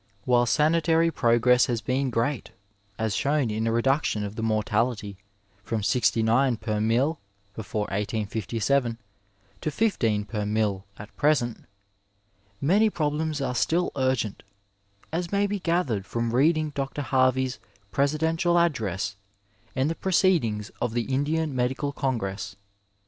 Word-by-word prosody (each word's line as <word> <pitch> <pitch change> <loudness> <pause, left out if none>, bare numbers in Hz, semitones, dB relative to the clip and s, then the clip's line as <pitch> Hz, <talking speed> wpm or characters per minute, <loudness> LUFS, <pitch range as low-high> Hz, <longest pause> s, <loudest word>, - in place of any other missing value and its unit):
While 120 -1 +3
sanitary 165 +3 +3
progress 120 -2 +4
has 120 -2 0
been 130 +4 -1
great 120 +3 -1 0.5
as 110 -2 -1
shown 140 -4 +1
in 110 +1 -1
a - - +1
reduction 120 -2 +1
of 100 +1 -5
the 115 - -4
mortality 110 -1 0 0.5
from 110 -1 -2
sixty 115 0 +2
nine 120 +2 +3
per 105 -1 -2
mille 125 +9 +1 0.3
before 110 0 -4
1857 110 +4 -1 0.6
to - - -1
fifteen 115 - +1
per 105 0 -3
mille 105 -2 -1
at 105 +1 -11
present, 140 -6 +1 0.9
many 205 +9 +3
problems 155 -3 -1
are 130 -2 -1
still 170 +7 +1
urgent, 130 -6 0 0.7
as 170 +2 -2
may 200 0 +2
be 205 0 -2
gathered 165 - 0
from 115 0 -2
reading 155 +4 +3
Dr. 140 +1 -3
Harvey's 130 0 +1 0.3
Presidental 160 - +1
address 105 - 0 0.6
and 130 +2 +1
the 165 - 0
proceedings 165 - +1
of 120 -1 -1
the 120 +2 -1
Indian 150 +2 0
Medical 130 +3 -1
congress. 105 -8 -3
125 Hz, 130 wpm, -26 LUFS, 110-150 Hz, 0.9 s, progress